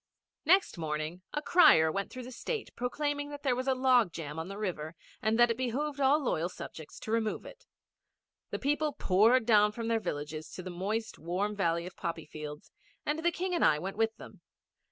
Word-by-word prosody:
Next 380 Hz, -, +4 dB
morning 155 Hz, +2 st, -3 dB
a 295 Hz, -, -3 dB
crier 160 Hz, -, +6 dB
went 200 Hz, +4 st, -2 dB
through 255 Hz, -, -7 dB
the 250 Hz, -, -9 dB
State 440 Hz, -, -4 dB
proclaiming 290 Hz, +4 st, -2 dB
that 290 Hz, 0 st, -8 dB
there 260 Hz, -4 st, +2 dB
was 255 Hz, +2 st, -3 dB
a 265 Hz, -, +3 dB
log 255 Hz, -6 st, +4 dB
jam 155 Hz, -1 st, -6 dB
on 165 Hz, -, -4 dB
the 195 Hz, +1 st, -7 dB
river 170 Hz, -6 st, -4 dB, 0.3 s
and 220 Hz, +1 st, +2 dB
that 240 Hz, 0 st, +6 dB
it 230 Hz, -, -2 dB
behoved 280 Hz, +4 st, -2 dB
all 275 Hz, +2 st, +5 dB
loyal 170 Hz, -8 st, 0 dB
subjects 160 Hz, -3 st, -9 dB
to 215 Hz, -, -5 dB
remove 225 Hz, -1 st, 0 dB
it. -, -, -13 dB, 0.8 s
The -, -, -3 dB
people 295 Hz, +2 st, 0 dB
poured 225 Hz, +2 st, +4 dB
down 210 Hz, -2 st, +5 dB
from 230 Hz, 0 st, -4 dB
their 225 Hz, -1 st, +2 dB
villages 155 Hz, -4 st, -5 dB
to 185 Hz, -, -7 dB
the 185 Hz, -, -6 dB
moist, 210 Hz, +6 st, -3 dB
warm 185 Hz, +6 st, -2 dB
valley 170 Hz, -3 st, 0 dB
of 180 Hz, -, -9 dB
poppy 165 Hz, -2 st, -4 dB
fields; 150 Hz, -1 st, -8 dB, 0.3 s
and 300 Hz, +2 st, 0 dB
the 345 Hz, +1 st, +2 dB
King 360 Hz, +2 st, -2 dB
and 345 Hz, -, +1 dB
I -, -, +5 dB
went 190 Hz, +5 st, -5 dB
with 225 Hz, +1 st, +1 dB
them. -, -, -12 dB
220 Hz, 205 wpm, -31 LUFS, 170-265 Hz, 0.8 s, crier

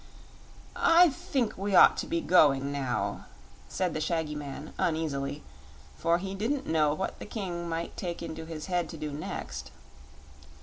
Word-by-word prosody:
"I 340 Hz, +1 st, +6 dB
think 260 Hz, -4 st, -1 dB
we 200 Hz, 0 st, 0 dB
ought -, -, +8 dB
to -, -, -3 dB
be 170 Hz, -, 0 dB
going 140 Hz, -6 st, +4 dB
now," 135 Hz, -3 st, -2 dB, 0.4 s
said 180 Hz, -3 st, -1 dB
the 155 Hz, -, -2 dB
shaggy 160 Hz, -1 st, -1 dB
man, 145 Hz, 0 st, -7 dB
uneasily, 145 Hz, -3 st, -1 dB, 0.5 s
for 170 Hz, +1 st, +2 dB
he 190 Hz, +2 st, -5 dB
didn't 235 Hz, +8 st, -1 dB
know 155 Hz, -2 st, +2 dB
what 190 Hz, -, -4 dB
the -, -, -7 dB
King 175 Hz, -6 st, -4 dB
might 165 Hz, +1 st, -3 dB
take 170 Hz, -2 st, -4 dB
into 160 Hz, -1 st, -6 dB
his 160 Hz, -2 st, -6 dB
head 175 Hz, -3 st, -1 dB
to 165 Hz, -, -7 dB
do 155 Hz, -1 st, -4 dB
next. 65 Hz, -, -5 dB
165 Hz, 160 wpm, -29 LUFS, 150-185 Hz, 0.5 s, ought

